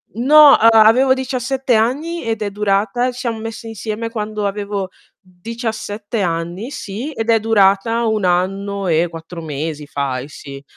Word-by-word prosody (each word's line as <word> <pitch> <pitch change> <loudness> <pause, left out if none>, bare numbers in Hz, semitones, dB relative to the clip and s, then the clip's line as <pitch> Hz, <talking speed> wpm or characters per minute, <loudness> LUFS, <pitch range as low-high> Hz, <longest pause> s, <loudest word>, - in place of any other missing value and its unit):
No, 290 +5 +7
a 225 - +6 0.2
avevo 260 +4 +4
17 260 0 -1
anni 285 +10 -1
ed 225 -1 -3
è 210 - -1
durata 210 +5 0
ci 245 - -11
siamo 235 -3 -3
messe 225 +1 -7
insieme 225 +1 -5
quando 215 -2 -3
avevo 200 -1 -4 0.3
17 220 +2 -5
anni, 175 +6 -3
sì, 230 +5 -6
ed 225 -5 -4
è 225 -1 +4
durata 220 +1 +2
1 220 -2 0
anno 195 +2 -1
e 165 0 +2
4 165 +1 -9
mesi 155 0 -5
fai 140 -2 -3
sì. 140 -1 -10
215 Hz, 150 wpm, -18 LUFS, 185-235 Hz, 0.3 s, No